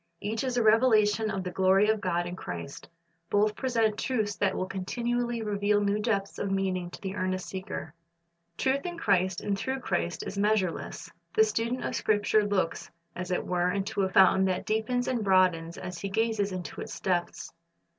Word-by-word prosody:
Each 220 +3 -2
is 255 -2 -1
a 240 - +3
revelation 220 -1 +4
of 195 -3 -2
the 180 - -4
glory 190 +3 +4
of 220 -1 +1
God 175 -3 0
in 175 0 -5
Christ. 90 - -7 0.4
Both 210 +1 +2
present 230 -5 0
truths 215 -5 -1
that 195 -1 +1
will 185 - -1
continually 235 +5 -2
reveal 205 0 +1
new 205 0 +1
depths 200 -3 -1
of 200 - -1
meaning 190 -2 -1
to - - -11
the 190 -1 -4
earnest 185 0 -2
seeker. 185 -5 -6 0.6
Truth 270 +1 +1
in 345 -1 -5
Christ 190 - +1
and 205 - -1
through 260 +6 -3
Christ 175 -3 -2
is 200 - -4
measureless. 205 -4 -1 0.2
The 440 - +6
student 250 - -1
of - - -2
Scripture 210 0 +2
looks, 195 -5 -1 0.3
as 180 0 -5
it 180 - -1
were, 180 0 +1
into 195 +1 -1
a 190 - +1
fountain 190 0 +5
that 185 -1 -1
deepens 235 +3 0
and 240 -4 0
broadens 180 -4 +2
as 180 -1 -6
he 195 - -4
gazes 220 -1 0
into 185 -2 -6
its - - -7
depths. 180 -2 -2
200 Hz, 185 wpm, -28 LUFS, 185-220 Hz, 0.6 s, The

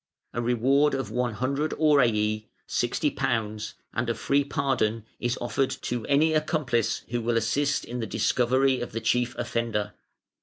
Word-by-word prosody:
A 120 - -1
reward 130 +5 +3
of 135 -6 -3
100 130 +5 -1
aurei 110 -8 +2 0.2
(£60), 110 -2 -1 0.2
and 120 +1 -1
a 115 - 0
free 140 +6 +1
pardon 125 -6 0
is 120 0 -1
offered 130 +2 0
to 120 -2 -3
any 150 +3 +3
accomplice 150 -8 0
who 120 0 -1
will 115 0 +1
assist 140 +6 +1
in 125 +1 -5
the 110 - -3
discovery 130 +3 +2
of 120 - -5
the 115 - -2
chief 125 +2 +1
offender. 110 -3 -2
120 Hz, 145 wpm, -26 LUFS, 115-135 Hz, 0.2 s, reward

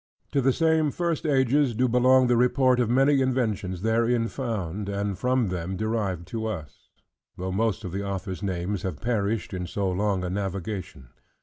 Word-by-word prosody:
To 140 - +2
the 135 +1 +3
same 160 +1 +2
first 170 +1 -2
ages 135 -2 +2
do 125 +3 +2
belong 130 +2 +5
the 120 -1 +3
report 125 +1 +3
of 120 -3 +1
many 135 +3 +4
inventions 110 -8 -1
therein 115 +1 +2
found, 105 -6 -3
and 100 0 -2
from 125 +2 +1
them 90 +1 -3
derived 105 -5 -2
to 110 0 -3
us; 80 -9 -7 0.5
though 95 +1 -3
most 110 +2 0
of 90 - -5
the 100 +3 -3
authors' 95 -2 -4
names 95 0 -2
have 95 - -4
perished 110 -3 -1
in 90 -1 -3
so 95 +1 -1
long 95 0 0
a 90 - -2
navigation. 95 - -4
110 Hz, 175 wpm, -26 LUFS, 95-125 Hz, 0.5 s, belong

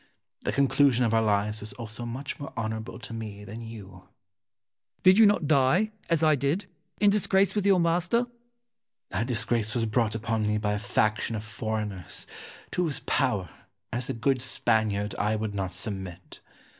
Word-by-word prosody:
The - - -2
conclusion 135 -2 +3
of 115 - +1
our 115 - +4
lives 105 0 +1
was 105 - -8
also 115 0 -7
much 130 +4 -5
more 140 - -6
honourable 110 0 -3
to 120 - -9
me 105 -3 -6
than 110 +3 -7
you. 110 -3 -8
Wolsey. 90 -1 -15 1.0
Did 185 +2 +7
not 205 - +3
you - - -1
die, 155 +10 +3 0.2
as 165 -2 +2
I 155 -1 +6
did, 145 +7 0 0.3
in 205 -1 +5
disgrace 200 -2 +3
with 205 -2 0
your 195 -2 +5
master? 175 +6 +2
Ximenes. 245 0 -6 0.8
That 115 - -1
disgrace 115 -2 +1
was 115 -2 +1
brought 110 0 +1
upon 110 -1 -1
me 105 0 +1
by 105 -1 0
a 105 - -1
faction 110 +2 0
of 105 - -4
foreigners, 105 -4 -4 0.5
to 180 - 0
whose 155 -5 -1
power, 95 -5 0 0.4
as 125 +4 -2
a - - 0
good 130 +2 +1
Spaniard, 110 -5 +1
I 105 +1 +1
would 110 -1 -3
not 95 -2 -3
submit. 95 -5 -6
115 Hz, 180 wpm, -27 LUFS, 105-140 Hz, 1.0 s, Did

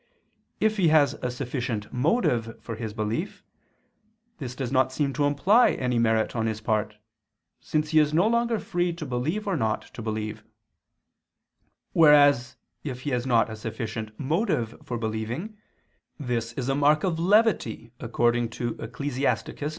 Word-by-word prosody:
If 215 0 +2
he 185 -4 +3
has 155 -2 +4
a 125 - -1
sufficient 125 -4 -4
motive 125 - +1
for 115 - -7
his 110 -1 -5
belief, 110 - -3 1.0
this 125 -4 -6
does 130 -3 -4
not 130 -1 +2
seem 140 0 -1
to 145 +1 +1
imply 190 - +4
any 125 -2 0
merit 110 0 +1
on 110 -1 0
his 110 -1 -2
part, 110 -1 -1 0.6
since 155 -1 -1
he 155 - +5
is 150 -1 +3
no 170 +5 +3
longer 235 0 +2
free 175 -3 -1
to 165 -2 -6
believe 145 +11 -2
or 195 -3 0
not 110 -7 -1
to - - -7
believe: 110 -1 -4 1.5
whereas 145 -5 +5 0.3
if 130 -4 -5
he 145 - -3
has 125 0 -1
not 115 -3 +3
a - - -5
sufficient 110 0 -6
motive 150 - 0
for 120 - -4
believing, 115 - -4 0.6
this 120 -4 -2
is 130 0 -4
a 135 - +1
mark 145 +2 +3
of 175 -4 0
levity, 210 +4 +2
according 120 0 +1
to 120 0 -3
Ecclus. 140 -2 -5
130 Hz, 155 wpm, -26 LUFS, 115-155 Hz, 1.5 s, he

